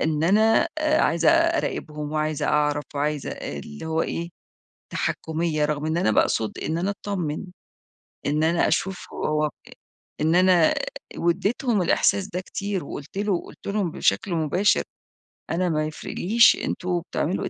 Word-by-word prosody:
إن 155 -1 0
أنا 220 - +4
عايزة 305 - +3
أراقبهم 320 - 0
وعايزة 155 -1 -1
أعرَف 150 0 +1
وعايزة 145 0 -1
اللي 75 - -7
هو 160 0 0
إيه، 170 0 -3 0.6
تحكُّمية. 160 -1 -1
رغم 150 0 -2
إن 160 +1 0
أنا 140 -11 +2
باقصد 110 +1 +1
إن 160 +2 -2
أنا 180 +4 0
أتطمن، 185 -7 -3 0.8
إن 150 +2 +1
أنا 165 +1 +3
أشوف 190 -2 -1
هو 150 0 0
آآ 150 - -1 0.7
إن 160 +2 +3
أنا 180 -3 +5 0.4
واديتهم 200 +6 +1
الإحساس 190 +2 +2
ده 195 -3 -4
كتير، 200 0 -4
وقلت 145 +5 -8
له 200 -3 0
قلت - - -13
لهم 200 -4 0
بشكل 130 - +1
مباشر: 170 +6 +2 0.7
"أنا 180 +1 0
ما 155 -1 0
يفرقليش 210 +8 +3
أنتم 180 -1 -1
بتعملوا 175 0 -2
إيه - - -3
170 Hz, 140 wpm, -24 LUFS, 150-195 Hz, 0.8 s, أنا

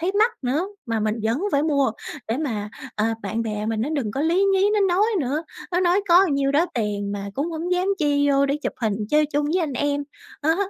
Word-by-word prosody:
thấy 355 +4 0
mắc 445 +3 +5
nữa 285 +9 0 0.2
mà 225 -2 -1
mình 215 0 0
vẫn 225 +4 +1
phải 280 - +3
mua 285 -5 +2 0.4
để 225 - 0
mà, 220 -9 -3 0.3
à, 225 +1 +1
bạn 220 +3 -2
bè 215 -1 -3
mình 220 -1 -1
nó 240 - -1
đừng 275 -9 -1
có 270 - -3
lí 335 +5 +2
nhí 390 +2 +3
nó 420 - +2
nói 405 +4 +4
nữa. 290 +4 -1 0.3
Nó 355 - +2
nói 365 +2 +3
có 355 +3 +7
nhiêu 280 -3 +1
đó 315 +5 +3
tiền 205 -3 -2
mà 200 0 -5
cũng 295 +8 -2
hổng 335 +2 -3
dám 360 +1 +1
chi 285 -2 +2
vô 275 0 +3
để 280 +1 0
chụp - - -1
hình 215 -3 +1 0.2
chơi 300 0 +4
chung 290 0 -1
với 330 +5 +1
anh 310 -4 -1
em. 285 +2 0 0.4
Đó, 320 +2 +3
285 Hz, 240 wpm, -23 LUFS, 225-330 Hz, 0.4 s, có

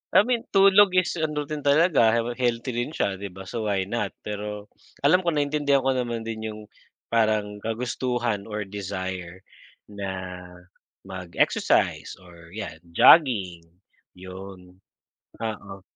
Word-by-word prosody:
I - - +8
mean, 240 0 -1
tulog 195 0 +6
is 185 -1 +1
ano 150 -2 -1
din 150 +1 -5
talaga, 145 -5 +4
well 120 - -3
healthy 120 0 0
rin 120 +6 -3
siya 95 -1 -1
'di 100 - -5
ba, 95 0 -10
so 110 +3 -4
why 100 -2 +1
not? 105 0 -3
Pero 105 0 -6 0.3
alam 160 +6 +5
ko 170 -3 -1
naiintindihan 145 -2 +1
ko 135 - +2
naman 120 -3 -2
din 110 -1 -5
yung 110 0 -7 0.5
parang 110 -2 +1
kagustuhan 115 -1 -2
or 105 -1 -3
desire 95 -2 -6 0.5
na 100 -1 -5 1.0
mag-exercise 95 -3 0
or 85 0 -15
'yan 100 -8 -6 0.2
jogging 95 - +5 0.5
yun. 95 0 -11 0.6
Oo 110 -3 -5
110 Hz, 130 wpm, -25 LUFS, 95-135 Hz, 1.0 s, I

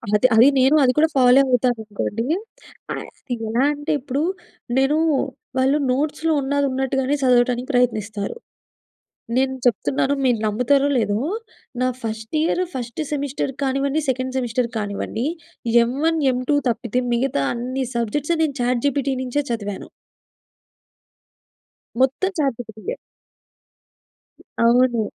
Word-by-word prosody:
అదే 230 +5 +5
అది 230 +4 +8
నేను, 265 +4 +5
అది 250 - +4
కూడా 315 +1 +5
ఫాలో 255 0 +6
అవుతాననుకోండి. 230 -3 -1 0.7
ఆహ్, - - -6 0.4
ఎలా 235 +4 +1
అంటే 290 +2 -4
ఇప్పుడు 275 +1 -3 0.6
నేనూ 270 +3 +3 0.6
వాళ్ళు 265 +3 +3
నోట్స్‌లో 300 +4 0
ఉన్నదున్నట్టుగానే 270 -1 0
సదవటానికి 250 0 +3
ప్రయత్నిస్తారు. 215 - 0 1.0
నేను 265 0 +2
చెప్తున్నాను 265 +4 +1
మీరు 245 -2 +3
నమ్ముతారో 250 +6 +2
లేదో, 205 -3 +1 0.6
నా 255 - +3 0.2
ఫస్ట్ 220 +3 -5
ఇయర్ 335 +3 +1
ఫస్ట్ 245 +2 -4
సెమిస్టర్ 280 -2 -2
కానివ్వండి 275 +3 0
సెకండ్ 260 0 -2
సెమిస్టర్ 245 -1 -1
కానివ్వండి. 210 +3 -3 0.6
ఎం 235 - -2
1 325 0 +2
ఎం 250 - -2
2 290 - +4
తప్పితే 240 +1 -1
మిగతా 235 - 0
అన్ని 255 +3 -3
సబ్జెక్ట్స్ 270 +8 0
నేను 290 -3 -1
చాట్‌జిపిటి 265 +3 0
నించే 260 +3 -1
చదివాను. 205 -4 -4 2.1
మొత్తం 270 +9 +2
చాట్‌జి‌పిటి‌యే. 230 -6 -3 1.7
అవును. 240 0 +4
255 Hz, 110 wpm, -21 LUFS, 235-275 Hz, 2.1 s, అది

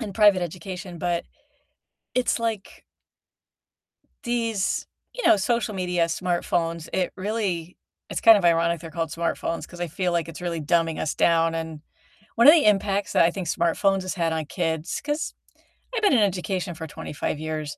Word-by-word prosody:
in 205 - -5
private 205 -3 +5
education, 180 +1 -6
but 175 0 -1 0.9
it's, 250 -1 +1
like 225 -4 -4 1.4
these, 230 -4 -1 0.3
you - - -2
know, - - +7
social 230 +2 0
media, 180 -2 0
smartphones, 170 -1 -1
it 185 -1 0
really 185 -4 -2 0.3
it's, - - -2
kind 225 -2 +8
of, 190 - -4
ironic 170 0 +3
they're 165 - -9
called 165 0 -3
smartphones 165 0 -2
'cause 175 - -12
I 175 - -2
feel 180 +2 -1
like 170 -1 0
it's 165 - -8
really 170 -2 -3
dumbing 165 +1 +1
us 155 - -1
down, 165 -1 +3
and 160 -2 -5 0.6
one 235 +4 +5
of 300 - +11
the 325 -3 +4
impacts 200 -1 +2
that - - +5
I 170 - +3
think 185 -3 -5
smartphones 185 +4 +1
has 185 +2 -4
had 165 -3 0
on 160 -1 -2
kids 160 0 -2
'cause 295 +2 -2 0.6
I've - - 0
been 410 -8 +4
in 250 - +5
education 185 -3 -1
for 160 0 -6
25 150 0 -4
years, 155 -1 -4
175 Hz, 170 wpm, -24 LUFS, 165-200 Hz, 1.4 s, of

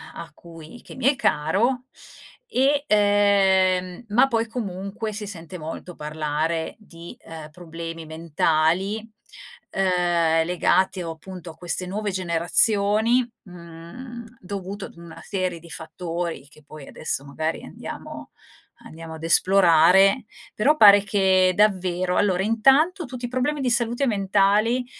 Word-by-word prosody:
a 165 - -8
cui 165 +7 -13
che - - -13
mi - - -5
è 275 - +4
caro, 235 - 0 0.6
e 285 - +1
ehm, 195 -3 +2
ma 240 +6 +4
poi 230 -3 -1
comunque 215 0 -5
si 210 0 -4
sente 180 -2 -8
molto 165 +2 -8
parlare 155 +2 -3
di, 170 -5 -12
ehm, 160 -2 -10
problemi 165 0 -8
mentali, 160 +4 0 0.7
ehm, 175 -3 +1
legati 185 +2 +1
o 165 - -5
appunto 175 +1 -10
a - - -17
queste 180 +1 -2
nuove 205 +2 -3
generazioni, 205 +6 +2 0.2
mhmm, 180 +8 -11 0.2
dovuto 195 +1 -6
ad - - -14
una 170 -1 -12
serie 185 -4 -3
di 170 +1 -16
fattori, 165 -2 -5
che 155 - -18
poi 150 -2 -12
adesso 140 -2 -2
magari 155 +3 -4
andiamo - - -9 0.5
andiamo 160 0 -10
ad 160 - -12
esplorare. 185 +4 +4 0.3
Però 285 +9 +2
pare 205 -5 +8
che 190 -2 +3
davvero 185 -3 +1
allora 190 -2 +1
intanto 275 - +3
tutti 250 -2 -7
i - - -3
problemi 255 +5 -2
di 255 -3 0
salute 240 +2 +1
mentali, 205 +3 +1
185 Hz, 130 wpm, -23 LUFS, 165-215 Hz, 0.7 s, pare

